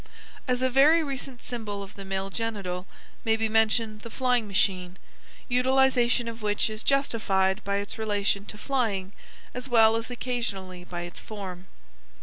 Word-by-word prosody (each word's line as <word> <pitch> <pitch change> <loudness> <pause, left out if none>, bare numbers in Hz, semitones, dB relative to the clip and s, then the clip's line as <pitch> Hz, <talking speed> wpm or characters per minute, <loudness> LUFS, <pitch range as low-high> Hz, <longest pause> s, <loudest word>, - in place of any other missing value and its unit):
As 250 0 +1
a 260 - +3
very 300 +6 +6
recent 270 -3 -5
symbol 210 -4 -5
of 195 - -11
the 195 - -9
male 195 0 -3
genital 195 -5 -3 0.4
may 225 0 +2
be 225 0 +1
mentioned 220 0 +2
the 230 - -8
flying 250 -2 +1
machine, 185 -2 +1 0.5
utilization 250 -1 +3
of 230 0 -6
which 210 +1 +1
is 215 0 -4
justified 210 -8 +2
by 200 0 -1
its 200 +2 -4
relation 205 -2 0
to 210 - -8
flying 210 -7 -1 0.4
as 250 +2 -5
well 225 -2 +6
as 225 +1 -2
occasionally 205 -8 -3
by 175 -1 -6
its 175 0 -8
form. 190 -4 -7
220 Hz, 155 wpm, -27 LUFS, 195-245 Hz, 0.5 s, very